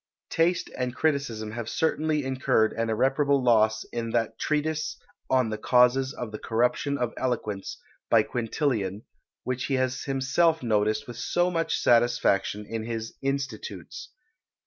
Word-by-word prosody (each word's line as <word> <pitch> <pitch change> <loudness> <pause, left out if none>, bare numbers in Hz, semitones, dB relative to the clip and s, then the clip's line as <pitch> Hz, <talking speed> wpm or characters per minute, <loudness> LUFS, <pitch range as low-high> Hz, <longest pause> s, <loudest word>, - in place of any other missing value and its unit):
Taste 175 +2 +1
and 125 -1 -3
criticism 130 -8 -1
have 115 0 -5
certainly 155 -2 0
incurred 130 -4 +1
an 115 0 -1
irreparable 135 +4 +2
loss 110 -2 +3
in 115 -1 -2
that 115 0 -1
Treatise 155 0 -1 0.3
on 130 -4 +2
the 110 - -3
Causes 125 +3 +4
of 120 -5 -6
the 105 - -6
Corruption 125 +5 0
of 120 -3 -2
Eloquence, 110 -6 -3 0.3
by - - +5
Quintilian; 115 - -2 0.4
which 130 0 -2
he 135 - 0
has 130 0 0
himself 135 +4 +2
noticed 110 +1 +1
with 120 -1 -8
so 175 +7 +1
much 165 -1 0
satisfaction 115 -4 +2
in 110 +1 -4
his 115 0 -4
"Institutes." 140 - -4
125 Hz, 140 wpm, -27 LUFS, 115-140 Hz, 0.4 s, by